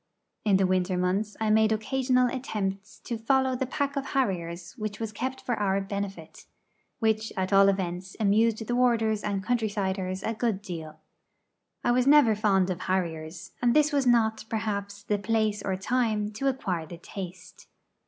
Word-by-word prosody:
In 200 Hz, -3 st, +4 dB
the 190 Hz, -, +3 dB
winter 185 Hz, 0 st, +1 dB
months 195 Hz, +4 st, -1 dB
I 220 Hz, -1 st, +1 dB
made 220 Hz, 0 st, +4 dB
occasional 255 Hz, +3 st, +2 dB
attempts 210 Hz, -6 st, -4 dB
to 235 Hz, -2 st, -4 dB
follow 260 Hz, +2 st, +2 dB
the 255 Hz, +1 st, -2 dB
pack 280 Hz, +1 st, -2 dB
of 275 Hz, -, -1 dB
harriers 180 Hz, -10 st, -2 dB
which 215 Hz, -4 st, -5 dB
was 225 Hz, -2 st, -3 dB
kept 260 Hz, +5 st, -4 dB
up -, -, -29 dB
for 240 Hz, -, 0 dB
our 195 Hz, -1 st, +1 dB
benefit 195 Hz, -5 st, -6 dB, 0.5 s
which 220 Hz, -1 st, 0 dB
at 190 Hz, +1 st, -1 dB
all 195 Hz, 0 st, +7 dB
events 185 Hz, -1 st, -3 dB
amused 220 Hz, +2 st, +2 dB
the 240 Hz, -, -2 dB
warders 225 Hz, -4 st, +2 dB
and 200 Hz, -2 st, -2 dB
country 230 Hz, -1 st, 0 dB
siders 190 Hz, -2 st, -2 dB
a 225 Hz, -, -1 dB
good 220 Hz, -3 st, -1 dB
deal. 160 Hz, -5 st, -7 dB, 0.8 s
I 240 Hz, -, +3 dB
was 250 Hz, +1 st, +2 dB
never 285 Hz, -6 st, +7 dB
fond 195 Hz, -3 st, +2 dB
of 180 Hz, 0 st, -4 dB
harriers, 165 Hz, -3 st, -3 dB
and 240 Hz, -1 st, +3 dB
this 300 Hz, 0 st, +4 dB
was 275 Hz, -3 st, +2 dB
not, 220 Hz, -3 st, +3 dB
perhaps, 200 Hz, -2 st, -3 dB
the 205 Hz, 0 st, 0 dB
place 215 Hz, -1 st, 0 dB
or 190 Hz, -1 st, -1 dB
time 215 Hz, 0 st, 0 dB
to 225 Hz, +6 st, -2 dB
acquire 185 Hz, -11 st, -1 dB
the 170 Hz, -, -9 dB
taste. 180 Hz, 0 st, -9 dB
210 Hz, 175 wpm, -27 LUFS, 190-235 Hz, 0.8 s, all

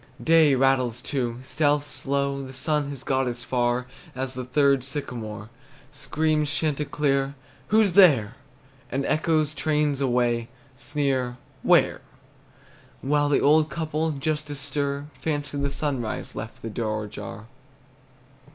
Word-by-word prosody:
Day 160 Hz, -4 st, +5 dB
rattles, 130 Hz, -3 st, +2 dB
too, 120 Hz, -5 st, -2 dB
Stealth's 145 Hz, +1 st, +1 dB
slow; 140 Hz, 0 st, -1 dB
The 130 Hz, -1 st, -8 dB
sun 150 Hz, +1 st, -1 dB
has 140 Hz, -3 st, -7 dB
got 130 Hz, -1 st, +1 dB
as 120 Hz, 0 st, -4 dB
far 120 Hz, 0 st, 0 dB, 0.3 s
As 130 Hz, 0 st, -3 dB
the 130 Hz, 0 st, -4 dB
third 140 Hz, +1 st, +3 dB
sycamore. 115 Hz, -6 st, -5 dB, 0.4 s
Screams 150 Hz, +1 st, 0 dB
chanticleer, 145 Hz, -2 st, 0 dB, 0.3 s
"Who's 215 Hz, -3 st, +3 dB
there?" 145 Hz, -, +6 dB, 0.6 s
And 135 Hz, +1 st, -1 dB
echoes, 155 Hz, -1 st, +1 dB
trains 150 Hz, 0 st, 0 dB
away, 120 Hz, -3 st, +1 dB, 0.3 s
Sneer 135 Hz, -3 st, -1 dB, 0.2 s
"Where?" -, -, +4 dB, 1.0 s
While 145 Hz, +1 st, +2 dB
the 145 Hz, -, +3 dB
old 155 Hz, +2 st, +4 dB
couple, 160 Hz, -1 st, -1 dB
just 150 Hz, +1 st, -2 dB
astir, 145 Hz, 0 st, -3 dB, 0.2 s
Fancy 145 Hz, -2 st, -2 dB
the 140 Hz, 0 st, 0 dB
sunrise 135 Hz, -5 st, -3 dB
left 110 Hz, -, -7 dB
the 115 Hz, -, -4 dB
door 110 Hz, -1 st, -2 dB
ajar! 105 Hz, +1 st, -8 dB
140 Hz, 125 wpm, -25 LUFS, 125-150 Hz, 1.0 s, there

